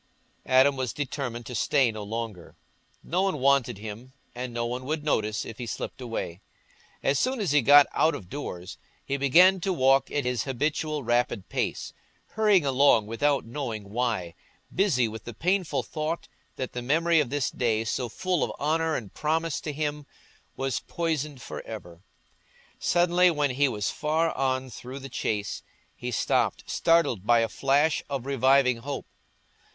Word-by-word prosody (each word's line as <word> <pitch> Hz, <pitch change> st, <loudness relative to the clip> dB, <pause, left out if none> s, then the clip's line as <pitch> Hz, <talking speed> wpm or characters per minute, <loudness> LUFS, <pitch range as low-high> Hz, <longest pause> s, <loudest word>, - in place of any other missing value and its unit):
Adam 130 Hz, +2 st, +5 dB
was 130 Hz, -4 st, -2 dB
determined 130 Hz, -4 st, -4 dB
to 125 Hz, -, -7 dB
stay 125 Hz, +2 st, +2 dB
no 110 Hz, -1 st, -7 dB
longer; 105 Hz, -4 st, -6 dB, 0.5 s
no 180 Hz, +3 st, 0 dB
one 195 Hz, -5 st, 0 dB
wanted 135 Hz, -4 st, +2 dB
him, 110 Hz, +5 st, -9 dB, 0.2 s
and 125 Hz, 0 st, -5 dB
no 120 Hz, 0 st, -2 dB
one 125 Hz, +2 st, -3 dB
would 150 Hz, +3 st, -3 dB
notice 110 Hz, -7 st, 0 dB
if 115 Hz, -, -9 dB
he 120 Hz, -, -5 dB
slipped 130 Hz, -, -5 dB
away. 115 Hz, -7 st, -5 dB, 0.6 s
As 135 Hz, 0 st, +2 dB
soon 255 Hz, 0 st, 0 dB
as 195 Hz, -8 st, 0 dB
he 150 Hz, -1 st, +5 dB
got 145 Hz, +3 st, +8 dB
out 160 Hz, -, +3 dB
of 90 Hz, -, -9 dB
doors, 90 Hz, -9 st, -7 dB, 0.3 s
he 140 Hz, -, -1 dB
began 175 Hz, +8 st, +5 dB
to 190 Hz, +2 st, -1 dB
walk 135 Hz, -5 st, +3 dB
at 145 Hz, -3 st, -1 dB
his 125 Hz, -3 st, -1 dB
habitual 150 Hz, +2 st, -1 dB
rapid 120 Hz, -4 st, 0 dB
pace, -, -, -2 dB, 0.4 s
hurrying 210 Hz, -7 st, +3 dB
along 135 Hz, -5 st, +4 dB
without 140 Hz, +6 st, 0 dB
knowing 115 Hz, -5 st, -5 dB
why, 110 Hz, -8 st, -1 dB, 0.4 s
busy 160 Hz, -, +2 dB
with 110 Hz, 0 st, -8 dB
the 120 Hz, -, -7 dB
painful 170 Hz, -, 0 dB
thought 155 Hz, +2 st, -4 dB, 0.3 s
that 130 Hz, -, -5 dB
the 125 Hz, -, -4 dB
memory 165 Hz, +6 st, +3 dB
of 145 Hz, -5 st, 0 dB
this 145 Hz, -1 st, -1 dB
day, 115 Hz, -3 st, 0 dB
so 120 Hz, +2 st, -2 dB
full 185 Hz, +6 st, -1 dB
of -, -, -1 dB
honour 160 Hz, +2 st, +1 dB
and 105 Hz, -5 st, -5 dB
promise 160 Hz, +1 st, -1 dB
to 150 Hz, -, -4 dB
him, 150 Hz, 0 st, -3 dB, 0.5 s
was 135 Hz, -2 st, -1 dB
poisoned 150 Hz, -5 st, -3 dB
for -, -, -6 dB
ever. 90 Hz, -6 st, -9 dB, 0.8 s
Suddenly, 175 Hz, +1 st, +4 dB
when 145 Hz, -4 st, +1 dB
he 140 Hz, +3 st, +2 dB
was 105 Hz, -5 st, -2 dB
far 160 Hz, +2 st, 0 dB
on 130 Hz, -1 st, -1 dB
through 125 Hz, +4 st, -8 dB
the 135 Hz, 0 st, -8 dB
Chase, 105 Hz, -5 st, -2 dB, 0.3 s
he 125 Hz, -, -5 dB
stopped, 115 Hz, -, 0 dB
startled 165 Hz, -, +2 dB
by 120 Hz, +2 st, +4 dB
a 115 Hz, -, +1 dB
flash 145 Hz, +3 st, +2 dB
of 135 Hz, -3 st, -3 dB
reviving 135 Hz, -1 st, +3 dB
hope. 140 Hz, +4 st, -5 dB
135 Hz, 165 wpm, -27 LUFS, 120-150 Hz, 0.8 s, got